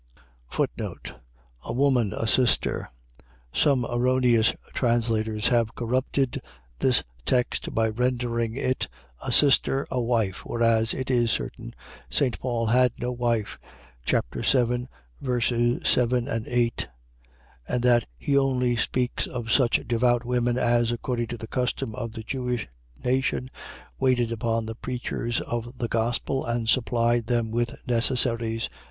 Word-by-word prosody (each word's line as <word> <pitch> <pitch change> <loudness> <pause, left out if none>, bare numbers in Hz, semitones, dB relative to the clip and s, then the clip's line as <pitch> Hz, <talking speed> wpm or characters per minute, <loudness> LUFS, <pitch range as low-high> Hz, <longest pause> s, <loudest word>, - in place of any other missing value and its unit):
A - - -5
woman, 125 -5 +2
a - - -3
sister.. 125 +2 +2 0.6
.Some 135 -5 +3
erroneous 120 -2 +3 0.2
translators 110 -3 +1
have 115 -2 +1
corrupted 130 +2 -1 0.4
this - - +3 0.2
text 125 - 0
by 115 0 +3
rendering 120 -1 -1
it, 130 -1 -1 0.3
a - - -3
sister, 135 -1 +4
a 125 - 0
wife: 115 -6 0
whereas, 115 -1 +1
it 130 0 -3
is 120 -2 +2
certain, - - -3 0.3
St. 130 -4 +1
Paul 120 -2 -1
had 125 +2 +3
no 125 0 -2
wife 120 - -1 0.4
(chap. - - +1 0.2
7 125 -1 +2 0.3
ver. 125 -2 0
7, 120 0 +1
8) 120 -1 0 0.8
and 125 -1 -1
that 120 -2 +4
he 140 - -1
only 130 -3 +2
speaks 125 +2 -1
of 115 -2 -5
such 120 -3 +3
devout 120 +1 +2
women, 120 0 +1
as, 120 -1 +2
according 120 0 -2
to 120 - -5
the 110 - -7
custom 125 -2 -2
of 115 0 -5
the 110 - -7
Jewish 125 -2 -3 0.4
nation, 130 0 0 0.5
waited 125 -3 +2
upon 115 -1 -1
the 115 - -5
preachers 120 0 -3
of 120 +2 -5
the 120 - -2
gospel, 120 +4 -1
and 120 -1 -2
supplied 120 -1 +2
them 120 -2 0
with 120 +1 -1
necessaries. 115 -1 +2
120 Hz, 130 wpm, -25 LUFS, 115-125 Hz, 0.8 s, sister